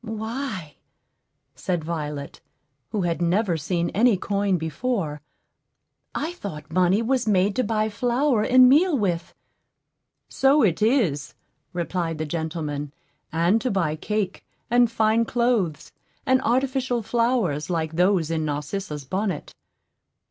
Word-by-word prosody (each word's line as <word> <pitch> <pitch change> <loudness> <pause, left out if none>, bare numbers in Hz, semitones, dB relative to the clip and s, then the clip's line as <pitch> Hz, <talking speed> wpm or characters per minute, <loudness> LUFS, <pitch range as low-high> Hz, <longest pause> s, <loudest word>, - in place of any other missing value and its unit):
"Why," 220 - -5 0.8
said 175 -3 -2
Violet, 150 -3 -5 0.5
who 205 -3 -1
had 170 -1 -1
never 180 +2 +2
seen 170 +2 -1
any 225 0 +3
coin 200 0 0
before, 160 - -2 0.9
"I 320 +4 -2
thought 155 - -8
money 185 +5 +3
was 255 0 0
made 195 -1 +2
to 255 - +2
buy 215 -1 0
flour 240 +3 +1
and 255 +3 +6
meal 305 +4 +4
with." 180 -6 -2 0.9
"So 275 +2 +3
it 180 -4 +2
is," 210 - +1 0.4
replied 170 -1 -2
the 155 - -2
gentleman, 150 -2 -4 0.4
"and 170 +7 +2
to 255 - -1
buy 170 -7 0
cake, 200 +3 -3 0.3
and 240 -1 +5
fine 225 0 +2
clothes, 230 -10 0 0.3
and 260 0 +3
artificial 255 -1 0
flowers 225 - 0
like 160 -3 -1
those 175 -1 +2
in 160 -1 0
Narcissa's 150 +1 -4
bonnet." 185 +1 -3
195 Hz, 125 wpm, -24 LUFS, 160-235 Hz, 0.9 s, and